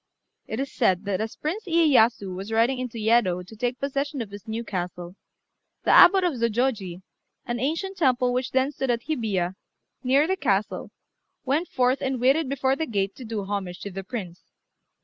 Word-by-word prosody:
It 220 - -4
is 275 0 -3
said 190 -5 +2
that 200 0 -1
as 220 0 -4
Prince 355 +9 -4
Iyéyasu 260 - +3
was 195 +4 -6
riding 235 +4 +2
into 250 -2 -5
Yedo 215 -5 +2
to 220 - -13
take 245 +3 -2
possession 275 +1 -2
of 220 -4 -5
his 205 +2 -10
new 225 +1 -3
castle, 180 -3 -5 0.7
the - - +3
Abbot 380 +1 +8
of 350 -3 +1
Zôjôji, 230 -6 -1 0.4
an 240 0 -3
ancient 330 - -2
temple 255 -5 +2
which 250 +1 -1
then 265 +2 +1
stood 265 -2 -3
at 235 -1 0
Hibiya, 205 - -1 0.5
near 270 +4 +4
the 380 +3 0
castle, 200 - -1 0.6
went 295 +7 +1
forth 255 +1 +1
and 265 -1 -1
waited 270 +4 +3
before 265 -1 +1
the 320 +2 -3
gate 195 -4 -1
to 260 - -8
do 220 -2 -3
homage 190 -3 -4
to 200 - -6
the 195 +1 -6
Prince. 185 -4 -6
240 Hz, 185 wpm, -25 LUFS, 200-270 Hz, 0.7 s, Abbot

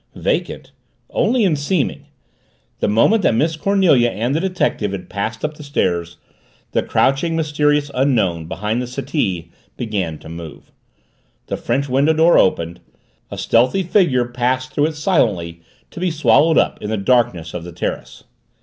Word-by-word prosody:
Vacant? - - -2 0.4
Only 245 -2 +2
in 180 -6 +3
seeming. 145 +1 -2 0.7
The - - 0
moment 115 - +3
that 115 - +2
Miss 160 +6 +1
Cornelia 165 -9 +3
and 120 +4 -2
the 155 - +1
detective 175 - -1
had 90 -2 -7
passed 110 +5 -3
up 155 0 -5
the 150 - -10
stairs, 85 - -1 0.5
the - - +1
crouching, 165 +5 +1
mysterious 150 -2 +1
Unknown, 105 - +1
behind 105 +7 -2
the 125 - -4
settee, 100 - -3 0.3
began 100 -9 -3
to - - -14
move. 80 -2 -10 0.7
The - - -3
French 135 +4 -1
window 140 +4 +2
door 160 +2 +5
opened 85 -2 +1 0.5
a - - -7
stealthy 125 +12 +2
figure 170 - +2
passed 125 +2 -2
through 145 +1 +2
it 160 - -5
silently 105 - 0 0.3
to - - -9
be 180 0 0
swallowed 160 0 +3
up - - +1
in 105 - -4
the 110 - -1
darkness 100 -7 +1
of 90 - -5
the 90 - -8
terrace. 85 - -5
125 Hz, 160 wpm, -19 LUFS, 100-155 Hz, 0.7 s, door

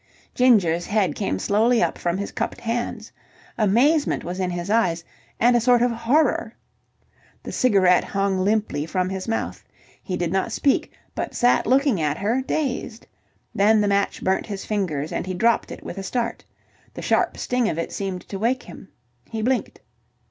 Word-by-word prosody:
Ginger's 190 -10 +3
head 205 -7 +1
came 95 - -2
slowly 220 - +2
up - - 0
from 175 +1 -2
his 200 - -4
cupped - - -3
hands. 230 -1 -3 0.4
Amazement 255 +9 +2
was 180 +2 -5
in 185 -1 0
his 175 0 -4
eyes, 185 -6 +1 0.4
and 240 +2 +4
a 240 - +3
sort 245 0 +4
of 245 - +2
horror. 235 +7 +1 0.9
The - - -6
cigarette 195 -7 +4
hung 195 -1 0
limply 195 -7 0
from 185 +1 -1
his 190 +1 -5
mouth. 225 - -3 0.4
He 185 -3 -4
did 175 -2 -2
not 190 - 0
speak, 280 - +1 0.2
but - - -4
sat 245 0 +3
looking 265 - +3
at 150 0 0
her, 225 +6 0
dazed. 260 -5 -3 0.5
Then 215 +2 +4
the 205 - +2
match 200 0 0
burnt 190 0 0
his 200 -3 -5
fingers, 165 -9 -2
and - - -3
he 185 - -3
dropped 230 +5 +2
it - - -9
with - - -6
a - - -5
start. 235 +4 -3 0.5
The - - -7
sharp - - +1
sting 250 -3 0
of 155 - -3
it 165 - -3
seemed 190 -2 -5
to 195 - -5
wake 245 +5 0
him. - - -12 0.4
He 220 -1 -4
blinked. 255 +2 -1
210 Hz, 175 wpm, -23 LUFS, 185-240 Hz, 0.9 s, and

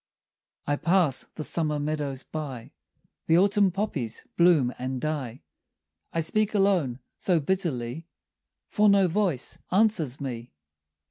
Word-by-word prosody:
I 145 - 0
pass 170 -6 +2
the 155 - -4
summer 150 -1 0
meadows 145 -2 -3
by, 135 -7 -6 0.6
The 165 - +5
autumn 200 +1 +4
poppies 165 - -3
bloom 165 -8 +4
and 130 +1 -3
die; 135 - -4 0.7
I 165 - 0
speak 215 +6 0
alone 185 -11 +2 0.2
so 180 -3 +2
bitterly 155 -4 -2 0.6
For 210 -1 +3
no 200 -2 +5
voice 175 -7 -1
answers 185 - +2
me. 120 -4 -6
155 Hz, 120 wpm, -26 LUFS, 130-190 Hz, 0.7 s, The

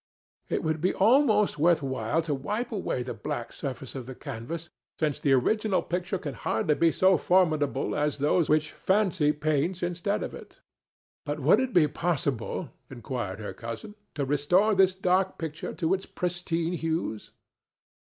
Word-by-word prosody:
"It - - -1
would 160 -1 -1
be 185 - +1
almost 220 - +4
worth 165 -1 +4
while 135 +4 -1
to 155 -2 -1
wipe 210 - -3
away 190 - -2
the 125 - -5
black 130 -6 -5
surface 135 -2 -6
of 130 -3 -7
the 130 - -7
canvas, 155 +12 -6 0.3
since 150 -3 0
the 140 - +3
original 190 - +2
picture 180 +2 -2
can 145 -6 -5
hardly 115 +5 0
be 165 +2 +3
so 185 +2 +4
formidable 155 -7 +2
as 150 -1 0
those 150 +3 +2
which 155 0 +2
fancy 185 -6 +2
paints 155 +4 -1
instead 175 +3 -1
of - - -5
it." - - -12 0.6
"But 145 0 -3
would 150 - +5
it 260 -1 -1
be 170 -8 +5
possible," 145 -2 -2 0.2
inquired 120 -6 -5
her 105 - -5
cousin," 115 - -7 0.2
to 145 -2 -1
restore 175 +10 +3
this 190 -1 +4
dark 185 0 +1
picture 160 -1 -5
to 165 +2 +1
its 190 0 -2
pristine 175 -1 -2
hues?" 160 -10 -2
160 Hz, 165 wpm, -27 LUFS, 140-185 Hz, 0.6 s, would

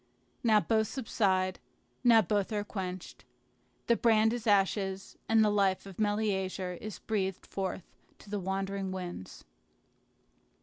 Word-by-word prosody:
Now 220 -3 +5
both 220 0 +1
subside; 190 -7 0 0.4
now 230 -3 +6
both 205 +3 0
are 210 -1 -1
quenched. 185 -3 -6 0.6
The 235 - +4
brand 225 -1 +3
is 235 -2 -4
ashes, 195 -1 +1
and 225 -1 +5
the 210 - +3
life 195 -2 +1
of 195 -1 -11
Meleager 195 -3 0
is 210 +4 -7
breathed 195 -4 -2
forth 190 -2 -4 0.3
to - - -17
the 205 0 -3
wandering 195 +1 -2
winds. 180 - -7
200 Hz, 130 wpm, -31 LUFS, 190-215 Hz, 0.6 s, now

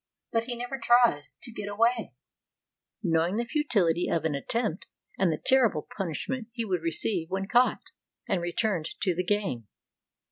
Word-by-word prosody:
But 230 -1 0
he 245 0 -4
never 245 +3 -5
tries 240 -14 +3
to 240 - -8
get 205 -2 -6
away, 230 +3 +1 0.9
knowing 170 +1 +1
the 235 +2 -1
futility 205 - +1
of 160 -1 0
an 160 - +1
attempt, 200 - -1 0.3
and 185 -3 +3
the 155 - -1
terrible 235 - +3
punishment 215 +6 -3
he 230 -1 -3
would 185 -5 -1
receive 165 +1 0
when 195 +1 -2
caught 245 +3 +2 0.4
and 180 - 0
returned 175 -2 -2
to 185 -3 +2
the 180 +2 -1
gang. 185 - -1
205 Hz, 155 wpm, -28 LUFS, 170-235 Hz, 0.9 s, tries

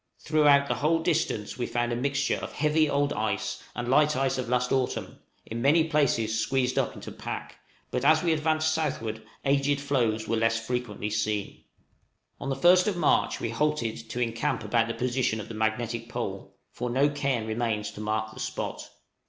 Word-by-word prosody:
Throughout 145 -2 +4
the - - +1
whole 155 +3 +2
distance 155 - -1
we 120 - -1
found 120 0 -1
a - - 0
mixture 140 +3 0
of - - -7
heavy 150 +1 +2
old 140 0 +1
ice 110 +3 -2
and 120 0 -3
light 150 +4 +4
ice 135 0 0
of 125 -2 -3
last 125 0 +1
autumn, 130 -2 -1 0.3
in 115 +1 -5
many 155 +5 +5
places 130 -8 +1
squeezed 130 +2 +1
up - - -1
into - - -8
pack; - - -6 0.3
but 125 - -1
as 155 +3 +5
we 170 -2 +3
advanced 155 0 +1
southward 115 -9 -2 0.2
aged 140 +1 +2
floes 120 -6 0
were 115 - +1
less 115 0 +2
frequently 115 -4 -3
seen. 105 -1 -2 0.7
On 140 - -4
the 135 - 0
first 180 +6 +5
of 200 -4 0
March - - +2
we - - -2
halted 120 -7 -1
to 120 - -4
encamp 115 -1 -1
at - - -8
about 115 +2 +2
the 115 - -3
position 125 -2 0
of 105 - -7
the - - -6
magnetic 115 +1 -2
pole 100 -5 -5
for 125 0 -4
no 135 +4 +3
cairn 140 -5 -1
remains 110 -1 -1
to 105 - -9
mark 110 0 -2
the - - -11
spot. - - -4
125 Hz, 190 wpm, -27 LUFS, 110-145 Hz, 0.7 s, many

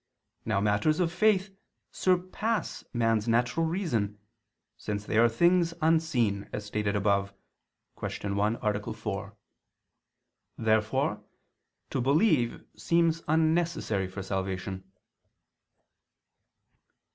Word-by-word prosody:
Now 110 -3 +1
matters 105 - +2
of 170 -2 +1
faith, 195 0 +2 0.4
surpass 185 +5 -1
man's 115 -2 +1
natural 120 +8 +2
reason, 120 - -1 0.6
since 105 -1 -4
they - - -3
are 120 0 +6
things 170 +6 +3
unseen 155 -11 +1
as 105 - -5
stated 105 0 -1
above 100 -1 +1 0.6
(Q. 100 -1 -4
1, 105 +3 +1
A. 105 -1 -1
4). - - -5 1.2
Therefore 110 -1 +1 0.7
to 130 - 0
believe 140 - +2
seems 165 -1 +1
unnecessary 160 - +1
for 95 +1 -7
salvation. 95 0 -4
115 Hz, 95 wpm, -28 LUFS, 105-165 Hz, 1.2 s, are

